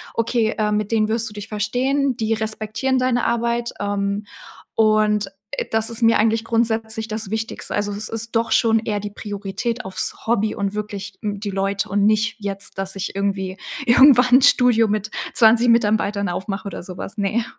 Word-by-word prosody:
„Okay, 230 Hz, -1 st, 0 dB
äh, 210 Hz, -1 st, 0 dB
mit 210 Hz, 0 st, -1 dB
denen 215 Hz, -1 st, +2 dB
wirst 225 Hz, 0 st, -1 dB
du -, -, -13 dB
dich 205 Hz, -1 st, -8 dB
verstehen, 250 Hz, +6 st, 0 dB
die 225 Hz, -1 st, 0 dB
respektieren 220 Hz, +3 st, -2 dB
deine 255 Hz, -2 st, +1 dB
Arbeit, 235 Hz, 0 st, -1 dB
ähm“, 200 Hz, 0 st, -2 dB, 0.5 s
und, 215 Hz, -1 st, +3 dB, 0.3 s
äh, -, -, -3 dB
das 225 Hz, 0 st, +3 dB
ist 230 Hz, +1 st, -4 dB
mir 230 Hz, -1 st, +5 dB
eigentlich 225 Hz, +1 st, +2 dB
grundsätzlich 225 Hz, -1 st, 0 dB
das 215 Hz, -2 st, -4 dB
Wichtigste. 220 Hz, +1 st, -4 dB
Also, 205 Hz, 0 st, -1 dB
es 210 Hz, +2 st, -3 dB
ist 225 Hz, +1 st, -3 dB
doch 225 Hz, 0 st, +1 dB
schon 225 Hz, 0 st, +3 dB
eher 215 Hz, -2 st, -2 dB
die 205 Hz, 0 st, -5 dB
Priorität 205 Hz, +3 st, -4 dB
aufs 190 Hz, 0 st, -2 dB
Hobby 220 Hz, -2 st, +1 dB
und 200 Hz, 0 st, -3 dB
wirklich 205 Hz, -2 st, -5 dB
n 205 Hz, -1 st, -3 dB
die 205 Hz, 0 st, -4 dB
Leute 195 Hz, +1 st, -1 dB
und 200 Hz, +1 st, +2 dB
nicht 215 Hz, +1 st, +2 dB
jetzt, 195 Hz, -1 st, -5 dB
dass 195 Hz, 0 st, -2 dB
ich 195 Hz, -, -4 dB
irgendwie 195 Hz, -1 st, -2 dB, 0.3 s
irgendwann 250 Hz, 0 st, +7 dB
'n -, -, -1 dB
Studio 245 Hz, -4 st, +4 dB
mit 210 Hz, 0 st, -2 dB, 0.2 s
20 235 Hz, +1 st, +5 dB
Mitarbeitern 210 Hz, -3 st, +2 dB
aufmache 195 Hz, +3 st, -4 dB
oder 200 Hz, -, -6 dB
sowas, 185 Hz, +4 st, -7 dB
ne. 210 Hz, +3 st, 0 dB
215 Hz, 180 wpm, -21 LUFS, 205-230 Hz, 0.5 s, irgendwann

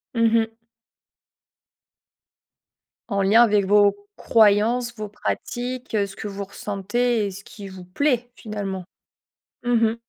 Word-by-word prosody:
Mmh 230 Hz, -1 st, +3 dB
mh. 225 Hz, 0 st, -4 dB, 2.6 s
En 200 Hz, -3 st, 0 dB
lien 215 Hz, +5 st, +6 dB
avec 205 Hz, -3 st, +3 dB
vos 205 Hz, 0 st, +3 dB
croyances, 230 Hz, +3 st, +3 dB
vos 215 Hz, -2 st, -6 dB
pratiques, 245 Hz, +4 st, -4 dB
ce 200 Hz, -3 st, -1 dB
que -, -, -6 dB
vous 200 Hz, 0 st, -5 dB
ressentez 210 Hz, +4 st, -1 dB
et 200 Hz, -, -3 dB
ce 200 Hz, +2 st, -10 dB
qui 200 Hz, -3 st, -10 dB
vous 190 Hz, -1 st, -10 dB
plaît 245 Hz, +5 st, 0 dB
finalement? 200 Hz, -4 st, -5 dB, 0.8 s
Mmh 245 Hz, 0 st, 0 dB, 0.2 s
mh. 230 Hz, -, -5 dB
210 Hz, 125 wpm, -23 LUFS, 200-235 Hz, 2.6 s, lien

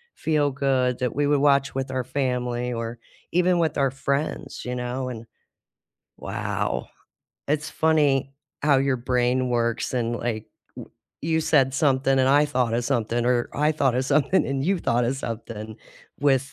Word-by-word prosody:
feel-good 135 Hz, -4 st, +1 dB
that 125 Hz, -1 st, -1 dB
we 145 Hz, 0 st, +1 dB
would 145 Hz, -1 st, +3 dB
watch 140 Hz, -2 st, +3 dB
with 135 Hz, 0 st, -2 dB
our 130 Hz, -1 st, -1 dB
family 125 Hz, -2 st, -1 dB
or 115 Hz, 0 st, -4 dB, 0.4 s
even 180 Hz, 0 st, +3 dB
with 160 Hz, -3 st, 0 dB
our 135 Hz, -2 st, +2 dB
friends, 140 Hz, +2 st, -3 dB
you 125 Hz, -, -3 dB
know? 125 Hz, +1 st, -3 dB
And 115 Hz, -2 st, -7 dB, 0.9 s
wow, -, -, -3 dB, 0.6 s
it's 150 Hz, +1 st, -1 dB
funny 145 Hz, -4 st, +2 dB, 0.3 s
how 140 Hz, -2 st, +4 dB
your 135 Hz, -1 st, +1 dB
brain 125 Hz, +1 st, +1 dB
works 115 Hz, -1 st, 0 dB
and, 120 Hz, -1 st, 0 dB
like, 115 Hz, -2 st, -3 dB, 0.3 s
w -, -, -9 dB, 0.3 s
you 160 Hz, +1 st, +1 dB
said 135 Hz, -4 st, +3 dB
something 135 Hz, -1 st, +2 dB
and 130 Hz, -, +3 dB
I 145 Hz, +2 st, +5 dB
thought 125 Hz, -5 st, 0 dB
of 120 Hz, 0 st, 0 dB
something, 120 Hz, -2 st, 0 dB
or 120 Hz, -1 st, +1 dB
I 150 Hz, +2 st, +2 dB
thought 140 Hz, -5 st, +1 dB
of 130 Hz, -, 0 dB
something 145 Hz, +6 st, +2 dB
and 135 Hz, 0 st, -2 dB
you 190 Hz, +1 st, +1 dB
thought 120 Hz, -6 st, +1 dB
of 125 Hz, +3 st, 0 dB
something 110 Hz, -3 st, -6 dB, 0.4 s
with 135 Hz, -2 st, +2 dB
130 Hz, 165 wpm, -24 LUFS, 125-145 Hz, 0.9 s, I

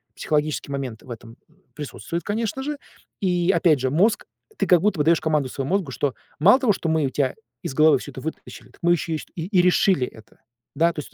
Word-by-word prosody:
Психологический 150 Hz, -1 st, -1 dB
момент 130 Hz, -5 st, -4 dB
в -, -, -16 dB
этом 115 Hz, 0 st, -10 dB, 0.4 s
присутствует, 160 Hz, +3 st, -5 dB
конечно 225 Hz, +4 st, -2 dB
же. 295 Hz, +1 st, -3 dB, 0.4 s
И 180 Hz, -1 st, +2 dB
опять 160 Hz, -8 st, +3 dB
же, 130 Hz, +1 st, 0 dB
мозг 200 Hz, -, +2 dB, 0.3 s
Ты -, -, 0 dB
как 180 Hz, -, +6 dB
будто 195 Hz, -4 st, +1 dB
бы -, -, +3 dB
даешь 165 Hz, +1 st, +4 dB
команду 150 Hz, -4 st, 0 dB
своему 135 Hz, +4 st, -4 dB
мозгу, 180 Hz, -9 st, -2 dB
что 135 Hz, 0 st, -1 dB, 0.3 s
Мало 205 Hz, -, +6 dB
того, 245 Hz, -5 st, +3 dB
что 165 Hz, -, -4 dB
мы 160 Hz, -1 st, +2 dB
у 135 Hz, -, 0 dB
тя 135 Hz, -1 st, -1 dB, 0.3 s
из 170 Hz, -7 st, -5 dB
головы 155 Hz, -1 st, +5 dB
всё 145 Hz, -, -8 dB
это 130 Hz, -, -9 dB
вытащили, 160 Hz, +3 st, -8 dB
так -, -, -22 dB
мы 175 Hz, 0 st, +4 dB
еще 165 Hz, -1 st, -2 dB
и -, -, +1 dB
и -, -, -1 dB
ст -, -, -11 dB
и 180 Hz, +2 st, +1 dB
решили 180 Hz, -5 st, +3 dB
это. 110 Hz, -, -16 dB, 0.4 s
Да, 170 Hz, +1 st, +3 dB
то 150 Hz, -, -4 dB
есть -, -, -14 dB
160 Hz, 230 wpm, -23 LUFS, 140-180 Hz, 0.4 s, как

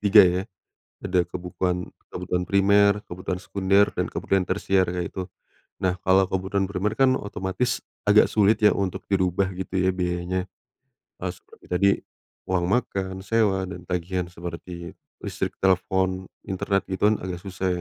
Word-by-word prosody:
3 105 Hz, 0 st, +8 dB
ya, 90 Hz, +1 st, +2 dB, 0.6 s
ada 90 Hz, -1 st, +2 dB
kebukuan 90 Hz, 0 st, -3 dB, 0.2 s
kebutuhan 90 Hz, 0 st, -2 dB
primer, 100 Hz, +1 st, +4 dB
kebutuhan 90 Hz, -1 st, -4 dB
sekunder, 100 Hz, +1 st, +3 dB
dan -, -, -1 dB
kebutuhan 95 Hz, -1 st, 0 dB
tersier 95 Hz, -1 st, +2 dB
kayak 90 Hz, -1 st, -3 dB
gitu, 95 Hz, 0 st, -5 dB, 0.5 s
nah 90 Hz, -1 st, +1 dB
kalo 95 Hz, +1 st, +4 dB
kebutuhan 95 Hz, +1 st, 0 dB
primer 105 Hz, +3 st, -1 dB
kan 135 Hz, -1 st, +5 dB
otomatis 100 Hz, +4 st, -2 dB, 0.2 s
agak 105 Hz, +1 st, +7 dB
sulit 105 Hz, +1 st, +4 dB
ya 105 Hz, -, +7 dB
untuk 95 Hz, -2 st, -2 dB
dirubah 95 Hz, 0 st, +1 dB
gitu 95 Hz, +1 st, -5 dB
ya 95 Hz, 0 st, +3 dB
biayanya, 90 Hz, +1 st, -2 dB, 0.7 s
harus -, -, -3 dB
seperti -, -, -20 dB
tadi, 100 Hz, +3 st, +4 dB, 0.6 s
uang 90 Hz, -2 st, +1 dB
makan, 95 Hz, -3 st, -1 dB
sewa, 100 Hz, -3 st, +2 dB
dan 85 Hz, 0 st, -8 dB
tagihan 90 Hz, 0 st, -2 dB
seperti 85 Hz, 0 st, -7 dB, 0.3 s
listrik, -, -, -3 dB
telpon, 95 Hz, 0 st, +1 dB, 0.2 s
internet 95 Hz, +1 st, 0 dB
itu 95 Hz, +2 st, +2 dB
kan 110 Hz, -, +2 dB
agak 90 Hz, -1 st, -4 dB
susah 95 Hz, -1 st, -3 dB
95 Hz, 145 wpm, -25 LUFS, 90-100 Hz, 0.7 s, 3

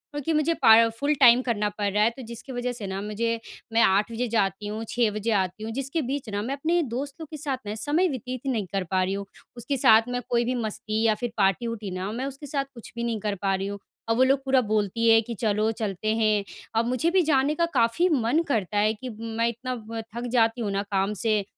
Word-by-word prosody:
क्योंकि 290 Hz, +3 st, -1 dB
मुझे 305 Hz, +2 st, +2 dB
पा 220 Hz, -, +9 dB, 0.2 s
फुल 285 Hz, +4 st, +1 dB
टाइम 245 Hz, -1 st, +7 dB
करना 210 Hz, -4 st, 0 dB
पड़ 205 Hz, 0 st, -2 dB
रहा 210 Hz, +1 st, +3 dB
है 225 Hz, -, +4 dB
तो 265 Hz, -, -7 dB
जिसकी 235 Hz, +3 st, -8 dB
वज़ह 245 Hz, 0 st, -2 dB
से 225 Hz, -4 st, -6 dB
ना 190 Hz, 0 st, -4 dB
मुझे 230 Hz, +2 st, -2 dB, 0.3 s
मैं 230 Hz, -, +4 dB
8 200 Hz, +4 st, +3 dB
बजे 240 Hz, +2 st, -2 dB
जाती 205 Hz, -2 st, 0 dB
हूँ, 215 Hz, +2 st, -4 dB
6 235 Hz, -2 st, +2 dB
बजे 215 Hz, +2 st, -2 dB
आती 195 Hz, 0 st, 0 dB
हूँ। 225 Hz, -, -4 dB
जिसके 275 Hz, +6 st, -2 dB
बीच 265 Hz, -2 st, -3 dB
ना 205 Hz, 0 st, -2 dB
मैं 255 Hz, +6 st, -3 dB
अपने 330 Hz, +5 st, +1 dB
दोस्तों 280 Hz, +5 st, -4 dB
के 305 Hz, 0 st, -9 dB
साथ 275 Hz, -3 st, -2 dB
मैं 205 Hz, +1 st, -4 dB
समय 295 Hz, +11 st, +1 dB
व्यतीत 255 Hz, -2 st, -5 dB
ही 270 Hz, -, +1 dB
नहीं 215 Hz, -5 st, -1 dB
कर 195 Hz, -1 st, 0 dB
पा 185 Hz, -1 st, +2 dB
रही 190 Hz, -, -1 dB
हूँ। 200 Hz, 0 st, -4 dB, 0.3 s
उसके 245 Hz, +4 st, -2 dB
साथ 220 Hz, -2 st, +6 dB
मैं 245 Hz, 0 st, -2 dB
कोई 240 Hz, -1 st, +2 dB
भी 255 Hz, +2 st, -1 dB
मस्ती 220 Hz, -1 st, -2 dB
या 220 Hz, -1 st, +3 dB
फ़िर 240 Hz, +2 st, -4 dB
पार्टी-वार्टी 210 Hz, +1 st, 0 dB
ना, 185 Hz, +2 st, -4 dB
मैं 245 Hz, +4 st, -3 dB
उसके 275 Hz, +2 st, -6 dB
साथ 275 Hz, 0 st, -1 dB
कुछ 235 Hz, -3 st, -12 dB
भी 235 Hz, -, -3 dB
नहीं 230 Hz, -2 st, -1 dB
कर 205 Hz, 0 st, -2 dB
पा 195 Hz, -1 st, +1 dB
रही 190 Hz, +1 st, -3 dB
हूँ। 200 Hz, 0 st, -5 dB, 0.3 s
और 225 Hz, -, +3 dB
वो 255 Hz, -, +4 dB
लोग 270 Hz, +1 st, +2 dB
पूरा 265 Hz, -1 st, +4 dB
बोलती 215 Hz, +1 st, +1 dB
है 225 Hz, 0 st, +7 dB
कि 230 Hz, +1 st, -6 dB
चलो 215 Hz, 0 st, +1 dB
चलते 215 Hz, +1 st, -1 dB
हैं 215 Hz, -2 st, +2 dB, 0.3 s
अब 225 Hz, +1 st, +2 dB
मुझे 255 Hz, +7 st, +1 dB
भी 375 Hz, -, +4 dB
जाने 280 Hz, +2 st, +2 dB
का 335 Hz, -, +2 dB
काफ़ी 235 Hz, +7 st, +3 dB
मन 275 Hz, 0 st, +2 dB
करता 210 Hz, -6 st, -1 dB
है 215 Hz, +1 st, +3 dB
कि 255 Hz, +4 st, -8 dB
मैं 230 Hz, 0 st, -1 dB
इतना 255 Hz, +2 st, -4 dB, 0.2 s
व 225 Hz, 0 st, -4 dB
थक 240 Hz, +1 st, -3 dB
जाती 230 Hz, -1 st, +2 dB
हूँ 205 Hz, -, -1 dB
ना 200 Hz, 0 st, -1 dB
काम 195 Hz, +1 st, +1 dB
से। 215 Hz, -3 st, +2 dB
230 Hz, 250 wpm, -25 LUFS, 210-255 Hz, 0.3 s, पा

